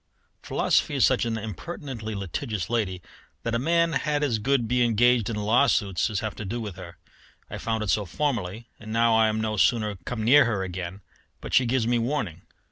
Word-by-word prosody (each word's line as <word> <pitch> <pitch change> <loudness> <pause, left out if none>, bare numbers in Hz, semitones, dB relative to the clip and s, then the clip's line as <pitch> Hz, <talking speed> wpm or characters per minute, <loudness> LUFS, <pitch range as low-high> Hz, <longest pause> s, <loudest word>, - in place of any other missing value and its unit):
Philosophy - - +1
is - - +5
such - - +2
an 115 -1 -1
impertinently 110 - -6
litigious 100 - -4
lady 95 -6 -1 0.4
that 115 - -2
a 115 - +1
man 170 +4 +2
had 150 -2 0
as 120 -7 +1
good 120 +1 +1
be 125 +1 +2
engaged 120 0 +3
in 115 - -2
law 110 +7 +3
suits 95 -4 +1
as 105 -3 -2
have 110 -1 -3
to - - -7
do 110 +5 -4
with 105 -5 -6
her. 85 -1 -10 0.5
I - - -5
found 110 -1 -2
it 100 - 0
so 105 +2 +1
formerly, 115 - -2
and 110 -1 -9
now 115 0 +3
I 110 0 +5
am 110 0 -1
no 110 -1 -2
sooner 105 -1 +2
come 115 +1 -4
near 130 +5 +6
her 105 -5 -1
again 90 +1 -6 0.4
but - - -8
she 125 - +4
gives 125 -1 +1
me 120 0 +2
warning. 115 - -2
110 Hz, 210 wpm, -26 LUFS, 105-120 Hz, 0.5 s, near